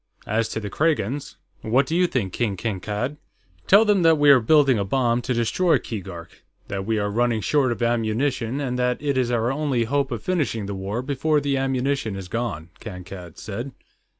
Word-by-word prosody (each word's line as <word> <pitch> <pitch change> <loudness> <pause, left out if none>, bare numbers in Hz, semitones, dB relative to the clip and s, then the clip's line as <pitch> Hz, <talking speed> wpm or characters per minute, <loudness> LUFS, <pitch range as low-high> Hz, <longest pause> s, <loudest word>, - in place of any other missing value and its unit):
As 110 +2 0
to - - -3
the 105 -2 -6
Kragans.... 145 -3 -1 0.3
What 125 +5 +2
do 160 - -2
you 180 +1 +4
think, 100 - -2
King 105 -5 -1
Kankad?" 105 +7 -3 0.5
"Tell 205 +3 +7
them 205 -3 +3
that 165 -1 +5
we 145 -1 +6
are 135 - +7
building 135 0 +4
a - - +1
bomb 120 +3 +1
to 125 - -4
destroy 160 +10 +2
Keegark; 95 -6 -8 0.3
that 95 0 -4
we 110 -1 +1
are 105 -1 0
running 115 0 +1
short 130 - +2
of 120 - -2
ammunition, 120 +2 0
and 125 -3 -2
that 125 0 +1
it 145 -1 -1
is 130 -2 +1
our 120 0 +1
only 135 -4 0
hope 140 +3 0
of 120 - -4
finishing 145 - -1
the 100 - -4
war 100 +5 -3
before 150 +3 +1
the 140 -1 0
ammunition 135 -4 -1
is 95 -2 -7
gone," 100 -8 -3
Kankad 90 -4 -9
said. 120 +6 -6
120 Hz, 195 wpm, -23 LUFS, 105-140 Hz, 0.5 s, Tell